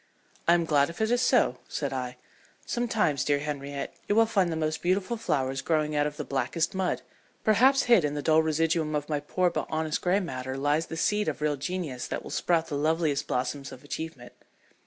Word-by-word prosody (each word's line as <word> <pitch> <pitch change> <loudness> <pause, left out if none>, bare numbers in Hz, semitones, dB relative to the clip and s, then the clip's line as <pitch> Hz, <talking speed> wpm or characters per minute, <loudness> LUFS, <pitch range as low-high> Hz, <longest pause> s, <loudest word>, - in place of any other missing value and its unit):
"I 170 - +7
am 170 -1 +1
glad 145 -2 +3
if 170 - -9
it 220 +1 +1
is 245 0 +3
so," 245 - +3
said 140 -2 -3
I. 125 -1 -4 0.5
"Sometimes, 220 - 0
dear 145 -1 +2
Henriette, 140 -1 -4
you 205 - +1
will 225 +1 +6
find 195 -6 +1
the - - -1
most 155 0 -1
beautiful 185 +5 0
flowers 135 - -1
growing 155 -2 0
out 145 0 +2
of 150 0 -7
the 150 - -3
blackest 140 +4 -1
mud. 190 -1 -1 0.4
Perhaps 255 +6 +5
hid 235 -8 +5
in 150 0 -1
the 145 - -3
dull 160 +1 +5
residuum 160 0 +1
of 150 0 -2
my 150 -1 0
poor 180 +4 0
but - - -3
honest 155 -1 -1
gray 185 +2 +2
matter 130 -7 -4
lies 145 +3 +1
the 160 - -6
seed 210 +5 +1
of 155 - -2
real 150 -1 +1
genius 145 -4 -4
that - - -4
will - - -9
sprout 165 -2 +1
the 150 - -4
loveliest 155 0 +1
blossoms 130 +2 -2
of 130 - -11
achievement." 145 -4 -6
155 Hz, 210 wpm, -28 LUFS, 145-180 Hz, 0.5 s, I